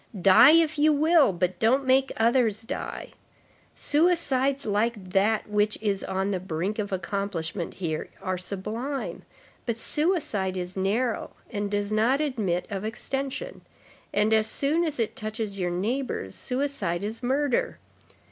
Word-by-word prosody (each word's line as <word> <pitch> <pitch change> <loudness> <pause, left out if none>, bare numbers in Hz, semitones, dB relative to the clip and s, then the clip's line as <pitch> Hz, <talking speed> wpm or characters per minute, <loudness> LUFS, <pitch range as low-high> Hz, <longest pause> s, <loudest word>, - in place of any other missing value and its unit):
Die, 195 +8 +8
if 325 -2 +3
you 305 +1 +5
will, 305 - +4
but 180 0 -2
don't 260 +5 +3
make 265 +1 +3
others 225 -2 +2
die. 260 +5 -5 0.6
Suicides 290 -4 +1
like 210 -2 -1
that 205 +4 +2
which 210 0 +1
is 200 -3 -1
on 190 +1 -1
the 190 - -1
brink 185 +4 -3
of 205 -1 -3
accomplishment 185 -2 -3
here 160 -4 -3
are 185 0 -2
sublime; 210 +9 -4 0.5
but 230 -1 -1
suicide 230 - -1
is 180 0 -5
narrow, 215 +5 -1 0.2
and 205 -1 -2
does 205 0 -1
not 230 +6 +2
admit 215 - -1
of 195 -1 -3
extension; 270 - -4 0.5
and 210 +2 +2
as 220 0 +3
soon 290 +8 +1
as 305 -5 -3
it 225 - -1
touches 215 -2 -3
your 180 -1 0
neighbors, 200 - -2
suicide 250 -10 -2
is 220 +2 -4
murder. 265 +1 0
220 Hz, 140 wpm, -26 LUFS, 195-270 Hz, 0.6 s, Die